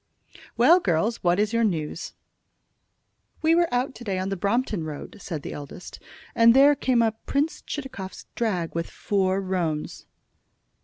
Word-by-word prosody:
"Well, 315 +10 +6
girls, 200 - 0
what 175 +1 +1
is 210 +2 +1
your 230 0 +2
news?" 165 -6 -2 1.3
"We 320 +1 +4
were 340 0 +3
out 250 +2 0
to 245 - -11
day 195 -4 -2
on 185 +1 -2
the 195 - -1
Brompton 205 0 0
Road," 155 +7 -7
said 160 -7 -6
the - - -6
eldest, 145 +5 -9 0.3
"and 230 +1 +6
there 280 +2 +7
came 255 -4 +2
up 220 -1 -2
Prince 290 +3 0
Chitakov's 260 -10 -7
drag 185 -8 -1
with 165 0 -3
four 190 -2 0
roans." 175 -5 -3
205 Hz, 155 wpm, -25 LUFS, 175-245 Hz, 1.3 s, there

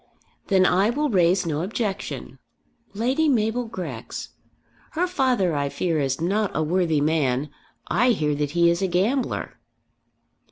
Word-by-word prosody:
"Then 190 -2 +4
I 190 +4 +3
will 290 +3 0
raise 185 -1 +3
no 155 -2 -1
objection. 200 +2 -4 0.6
Lady 260 +8 +1
Mabel 235 -1 +1
Grex! 160 - -6 0.6
Her 340 +3 +1
father, 255 - +1
I 140 -1 -1
fear, 165 +1 -1
is 135 -2 -1
not 200 +5 0
a 155 - +1
worthy 165 -1 +1
man. 145 -3 0 0.4
I 235 +9 +2
hear 155 -10 +1
that 145 0 -1
he 170 0 +5
is 170 - -1
a 190 - +1
gambler." 210 +9 -1
185 Hz, 145 wpm, -24 LUFS, 155-225 Hz, 0.6 s, he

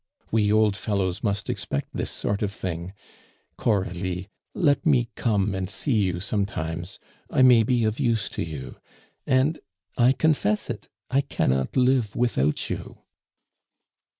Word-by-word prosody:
We 105 -2 +3
old 110 -2 +4
fellows 95 -3 -1
must 100 -3 -1
expect 70 - -3
this - - -2
sort 100 0 -2
of 105 -2 0
thing. 90 -2 -5 0.6
Coralie, 95 -3 -1 0.3
let 145 -9 +2
me 125 -7 +3
come 105 -3 +1
and 95 -1 -3
see 135 +5 -1
you 95 -5 +1
sometimes; 90 -3 -3 0.3
I 130 - +3
may 125 -3 +7
be 120 +1 +2
of 110 +3 0
use 115 -6 +1
to - - -4
you. 75 -5 -6 0.5
And 135 +5 +2 0.4
I 125 +2 +6
confess 135 -9 +1
it; - - -8 0.2
I 135 +2 +4
cannot 65 - 0
live 125 -4 +2
without 75 - +1
you." - - -6
105 Hz, 140 wpm, -25 LUFS, 95-125 Hz, 0.6 s, may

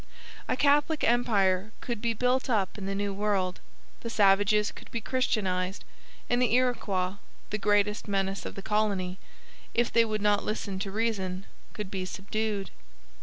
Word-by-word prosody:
A - - 0
Catholic 295 +3 +3
empire 215 -4 +2
could 235 -4 -4
be 230 -1 0
built 250 +3 +1
up 205 -6 +1
in 195 -2 -5
the 195 - -2
New 200 0 -1
World, 195 -3 0 0.4
the 230 - -5
savages 205 0 +4
could - - -13
be 230 - -3
christianized, 195 -6 -1 0.4
and 245 +1 +2
the 240 -2 +3
Iroquois, 205 -7 +1 0.3
the 210 - -1
greatest 210 +1 +2
menace 195 -1 -1
of - - -6
the 195 - -7
colony, 200 -4 0 0.6
if 240 0 +2
they 230 - +6
would 215 -2 -2
not 205 -1 +3
listen 200 -3 -3
to 195 0 -3
reason, 195 -3 -2 0.3
could 210 -3 -6
be 190 -2 -2
subdued. 200 +1 -3
210 Hz, 160 wpm, -28 LUFS, 195-230 Hz, 0.6 s, they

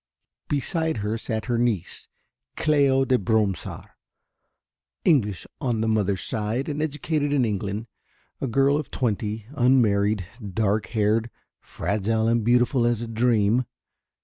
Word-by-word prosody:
Beside 160 +1 0
her 105 +2 -1
sat 110 -1 -3
her 120 -2 0
niece, 115 -7 -1 0.5
Cléo 140 -3 +3
de 130 -1 +3
Bromsart, 105 -1 -1 1.1
English 105 - +2
on 120 -6 -1
the 110 - 0
mother's 100 -3 +1
side 110 +5 -2
and 150 0 -3
educated 150 -1 -1
in 140 -4 +3
England, 105 0 -3 0.6
a 135 - -1
girl 135 +4 +3
of 150 - -4
twenty, 110 -2 -2
unmarried, 110 - +3 0.3
dark 110 0 +1
haired, 110 +1 +1 0.3
fragile 110 +4 -1
and 115 -1 +2
beautiful 120 +2 +3
as 120 -1 0
a - - -5
dream. 115 0 +2
115 Hz, 125 wpm, -24 LUFS, 105-135 Hz, 1.1 s, Cléo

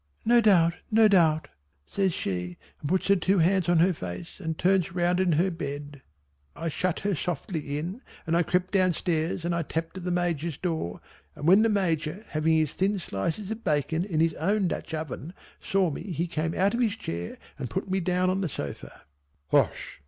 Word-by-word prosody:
"No 240 +1 +6
doubt, 175 -6 +5 0.2
no 220 0 +6
doubt," 165 -6 +3 0.4
says 195 - 0
she, 90 - -3 0.2
and 145 - -4
puts 185 +1 +1
her 200 - +7
two 190 +2 +2
hands 180 +1 +3
on 175 - +4
her 180 +3 +4
face 90 - -7
and 160 -4 -3
turns 180 -1 +2
round 175 0 +2
in 185 -3 +3
her 180 +5 +2
bed. 145 -3 -6 0.5
I 165 +1 -3
shut 180 +3 -1
her 200 0 0
softly 155 -3 -3
in 180 - -5 0.2
and 165 0 +1
I 170 - +4
crept 180 +2 0
down 185 -2 +4
stairs 165 0 -1
and 175 - 0
I 170 - 0
tapped 165 +3 -4
at - - -9
the 180 - -2
Major's 170 -4 -1
door, 160 - -3 0.3
and 145 - -4
when 190 +4 +7
the 225 - +3
Major 185 -1 0
having 155 +1 +1
his 155 -2 +2
thin 200 +2 +1
slices 170 - -3
of 225 +1 -5
bacon 155 +3 +1
in 165 -5 0
his 165 -1 +3
own 195 +4 +1
Dutch - - -5
oven 155 +2 -6 0.3
saw 190 -4 +1
me - - -5
he 170 +1 -1
came 165 -1 -2
out 195 +3 +2
of 235 - -1
his 225 -4 +2
chair 85 - -5 0.2
and 130 -4 -4
put 115 - -3
me 190 0 0
down 180 +1 +1
on 190 +1 -1
the 180 - -1
sofa. 75 - -7 0.5
"Hush!" - - +1
170 Hz, 205 wpm, -27 LUFS, 155-190 Hz, 0.5 s, her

